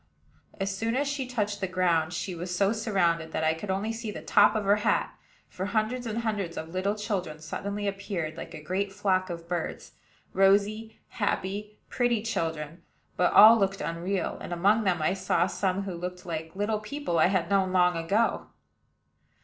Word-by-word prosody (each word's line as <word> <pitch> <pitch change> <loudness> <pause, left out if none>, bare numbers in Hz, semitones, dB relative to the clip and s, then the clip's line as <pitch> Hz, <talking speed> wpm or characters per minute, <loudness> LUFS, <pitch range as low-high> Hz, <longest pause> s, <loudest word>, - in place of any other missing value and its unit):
As 195 0 -1
soon 225 +4 -1
as 280 +2 +1
she 280 -2 -2
touched 210 -5 -2
the 190 - 0
ground, 175 -3 +1
she 180 +2 -3
was 175 +1 -4
so 200 +3 +2
surrounded 175 -7 0
that 160 - -1
I 160 0 +3
could 175 +5 -7
only 200 +4 -1
see 225 -1 -5
the 210 - -7
top 205 +1 +5
of 215 - 0
her 200 +1 +4
hat; 210 - 0 0.3
for 190 +2 -5
hundreds 230 +3 -1
and 230 +1 -3
hundreds 200 -6 -2
of 160 - -5
little 185 +4 -1
children 200 -7 -3
suddenly 200 +6 -4
appeared, 195 -5 -3
like 165 - -8
a 155 - -9
great 195 +4 -2
flock 190 -2 0
of 170 -1 -6
birds, 175 -1 -4 0.4
rosy, 205 +3 +2
happy, 205 0 -3
pretty 240 -4 0
children; 165 -6 -3 0.3
but 180 - +2
all 225 +2 +9
looked 195 -1 0
unreal, 170 +5 -2
and - - -7
among 200 +6 +2
them 175 -4 +1
I 155 - +2
saw 175 -2 +1
some 190 +1 -1
who 195 -2 -5
looked 180 +1 -6
like 160 0 -5
little 210 +2 0
people 215 - -2
I - - +6
had 185 -2 0
known 190 -2 +2
long 180 -1 +3
ago. 195 +8 0
195 Hz, 185 wpm, -28 LUFS, 175-210 Hz, 0.4 s, all